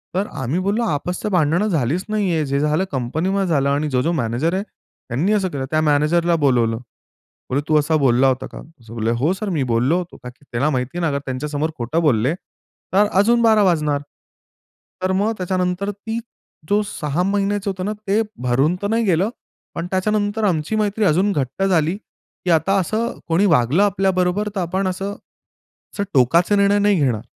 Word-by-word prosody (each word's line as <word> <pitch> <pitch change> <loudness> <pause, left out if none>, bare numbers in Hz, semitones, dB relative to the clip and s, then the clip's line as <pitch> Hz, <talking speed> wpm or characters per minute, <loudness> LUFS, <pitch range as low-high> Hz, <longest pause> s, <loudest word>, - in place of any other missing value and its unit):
तर 195 +3 0
आम्ही 130 +8 -1
बोललो, 210 +4 +1
"आपसच्या" 180 +1 -2
भांडणं 175 +3 +2
झालीच 160 - 0
नाहीये, 190 -8 0
जे 140 0 -1
झालं 150 +4 +1
कंपनीमध्ये 160 +10 -1
झालं 140 -5 +1
आणि 145 +2 0
जो-जो 130 +5 +1
मॅनेजर 120 +9 -1
आहे 190 +1 -1
त्यांनी 170 - -4
असं 200 -3 +1
केलं." 140 -5 -4
त्या 155 0 +2
मॅनेजरला 155 +3 +2
बोलावलं. 120 -4 +2 0.7
बोले, 135 +3 0
"तू 155 - +3
असा 150 +2 +1
बोलला 135 -2 +3
होता 130 -1 0
का?" - - -10 0.3
बोले. 115 0 -1
"हो 125 +8 +1
सर, 200 +2 -4
मी 160 -7 0
बोललो 125 +9 +2
होतो." 180 -1 -6
का 125 - -6
की 130 +3 -20
त्याला 125 +6 +1
माहिती 130 +2 -2
आहे 165 -3 0
ना 140 - -1
त्यांच्यासमोर 145 +3 -3
खोटं 125 +8 -1
बोलले 130 -3 +2 0.6
तर 205 +2 +4
अजून 235 +4 +4
12 220 -2 +5
वाजणार. 150 -6 +1 1.0
तर 185 0 0
मग 210 +3 +1
त्याच्यानंतर 185 +1 -1
ती 220 +3 -5 0.5
जो 205 +1 +3
6 155 -3 -2
महिन्याचं 200 +1 0
होतं 185 -1 -4
ना 210 - -1 0.2
ते 205 +3 +3 0.2
भरून 135 +7 +2
तर 200 - -1
नाही 230 +1 +1
गेलं, 185 +2 +2 0.5
पण 170 - -3
त्याच्यानंतर 205 +3 0
आमची 175 0 0
मैत्री 215 0 0
अजून 185 +4 +3
घट्ट 145 +2 -2
झाली 175 -3 +2
की 195 -3 -11
आता 170 +4 +3
असं 220 +6 -2
कोणी 170 +5 +2
वागलं 155 - +3
आपल्याबरोबर 195 0 +1
तर 190 - 0
आपण 185 +3 -1
असं, 190 +2 -3 0.8
असं 200 - -2
टोकाचे 165 - +4
निर्णय 200 0 +3
नाही 205 -2 +3
घेणार. 120 -6 +1
175 Hz, 180 wpm, -20 LUFS, 145-200 Hz, 1.0 s, 12